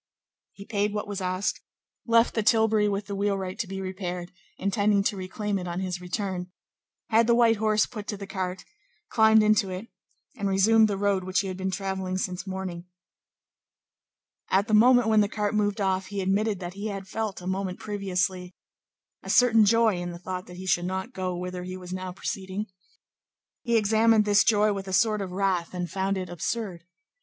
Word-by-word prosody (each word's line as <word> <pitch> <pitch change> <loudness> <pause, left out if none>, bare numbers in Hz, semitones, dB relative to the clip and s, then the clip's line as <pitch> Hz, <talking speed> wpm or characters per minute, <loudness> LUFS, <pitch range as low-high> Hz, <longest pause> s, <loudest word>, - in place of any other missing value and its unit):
He 200 - -11
paid 205 -1 -1
what 210 - -3
was 205 -1 -4
asked, 185 +2 -1 0.5
left 230 0 +4
the 225 - 0
tilbury 220 -1 +3
with 200 0 -2
the 200 - -6
wheelwright 195 0 -2
to 225 - -2
be 195 +1 -5
repaired, 180 -2 -5 0.3
intending 200 +1 +2
to 205 - 0
reclaim 200 +2 -3
it 180 - -6
on 175 +1 -3
his 180 -1 -3
return, 180 -1 -3 0.6
had 225 +1 +4
the 235 - +5
white 230 -2 +4
horse 215 0 +2
put 210 -4 -8
to 205 - -3
the 200 - -7
cart, 185 -2 -4 0.4
climbed 220 -1 +5
into 215 -2 +3
it, 185 +5 -6 0.5
and 200 -1 -2
resumed 215 +3 +5
the 200 -2 -2
road 200 -1 +1
which 185 +1 +1
he 195 - -4
had 185 - -4
been 190 +1 -2
travelling 190 -1 -3
since 185 +1 -4
morning. 185 -2 -5 1.6
At 195 +3 +2
the 215 - -2
moment 245 +2 +6
when 220 -1 +5
the 205 - +1
cart 210 -1 -1
moved 210 0 0
off, 190 -1 0
he 200 0 -5
admitted 200 +2 0
that 175 -1 -6
he 200 +2 -5
had 195 -2 -5
felt, 215 0 -3
a 180 - -11
moment 185 0 -2
previously, 185 -3 -2 0.7
a - - -10
certain 225 -3 +5
joy 225 -2 +3
in 175 0 -4
the 170 - -7
thought 185 +1 -6
that 180 0 -11
he 185 - -7
should 175 -1 +1
not 190 +7 -4
go 185 -3 -3
whither 180 0 -5
he 185 +1 -6
was 180 0 -8
now 185 0 -4
proceeding. 190 +2 -4 1.0
He 235 -1 +2
examined 220 0 +4
this 205 0 +5
joy 210 -1 +3
with 195 -1 -5
a 190 - -4
sort 215 +2 +3
of 190 -2 -5
wrath, 185 -2 -1
and 180 -1 -2
found 195 0 -1
it 185 -1 -4
absurd. 175 +1 -4
195 Hz, 195 wpm, -26 LUFS, 185-215 Hz, 1.6 s, moment